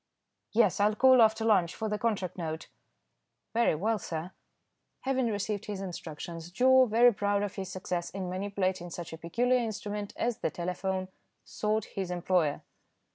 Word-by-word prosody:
"Yes. 210 -4 +3
I'll 210 +1 +3
call 260 +1 +6
after 220 0 +4
lunch 185 -6 +3
for 220 - -3
the 210 0 -2
contract 195 -6 -1
note." 160 -3 -5 0.8
"Very 235 -7 +3
well, 215 +7 0
sir." 165 0 -5 0.7
Having 260 -2 +1
received 210 -1 -2
his 205 -2 -4
instructions, 170 -2 -7
Joe, 255 +7 +5
very 235 +2 +5
proud 205 0 0
of 205 - -3
his 190 -1 -5
success 180 -2 -3
in 190 -1 -5
manipulating 185 -1 -2
such 170 -1 -7
a - - -6
peculiar 245 +10 +1
instrument 210 -2 -4
as 240 0 -1
the - - 0
telephone, 185 +2 -3 0.4
sought 215 0 -1
his 190 -2 -5
employer. 175 -4 0
200 Hz, 155 wpm, -30 LUFS, 180-220 Hz, 0.8 s, call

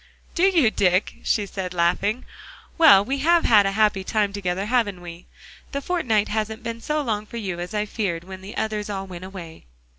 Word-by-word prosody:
"Do 360 - +2
you, 325 - +3
Dick?" 185 -1 +1
she 210 -3 +1
said, 185 -2 -6
laughing. 190 +7 0 0.5
"Well, 285 - +7
we 270 +4 -2
have 335 +4 +3
had 205 -3 +5
a 195 - -1
happy 210 -2 +2
time 205 0 0
together, 190 -1 -2
haven't 215 -5 0
we? 175 0 -11 0.5
The 280 - -1
fortnight 250 - 0
hasn't 220 +1 -3
been 230 0 -5
so 300 +4 -1
long 215 -4 -2
for 235 - -8
you 190 -6 -4
as 180 +5 -6
I 210 0 0
feared 195 -6 -3
when 190 +1 -10
the 195 +3 -9
others 215 -1 -2
all 195 -1 -4
went 185 -1 -9
away." 170 - -10
210 Hz, 200 wpm, -23 LUFS, 190-230 Hz, 0.5 s, Well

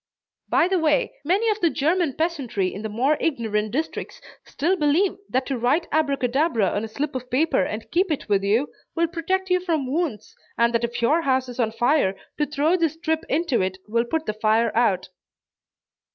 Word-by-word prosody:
By 340 - +4
the 375 -1 +1
way, 300 -3 +1
many 385 +9 +1
of 425 - -2
the 340 - +4
German 320 +1 +1
peasantry 270 - -1
in 200 - -6
the 220 - -4
more 260 +8 +1
ignorant 220 -8 -1
districts 295 +9 -4 0.2
still 345 +6 0
believe 330 +4 +2
that 260 +1 0
to 265 -2 -3
write 285 +9 +1
Abracadabra 275 - +1
on 205 - -2
a - - -3
slip 285 +7 -3
of 255 -1 -5
paper 290 -1 +2
and 215 +4 -5
keep 365 +2 +2
it 305 - -2
with 200 -2 +2
you, 215 +8 +1 0.3
will 335 0 +2
protect 375 +3 -2
you 365 - +4
from 330 -6 -1
wounds, 280 - -3 0.2
and 235 0 +3
that 235 0 +1
if 235 0 -3
your 305 +8 +3
house 260 -3 +1
is 245 +1 -9
on 225 -2 +1
fire, 235 -3 +2 0.2
to 295 - +1
throw 300 +4 +1
this 330 -4 +1
strip 320 0 -2
into 305 - +1
it 190 0 -2
will 230 +2 +1
put 320 +6 -2
the 215 - -2
fire 220 +2 +1
out. 205 -7 +2
280 Hz, 195 wpm, -23 LUFS, 230-325 Hz, 0.3 s, By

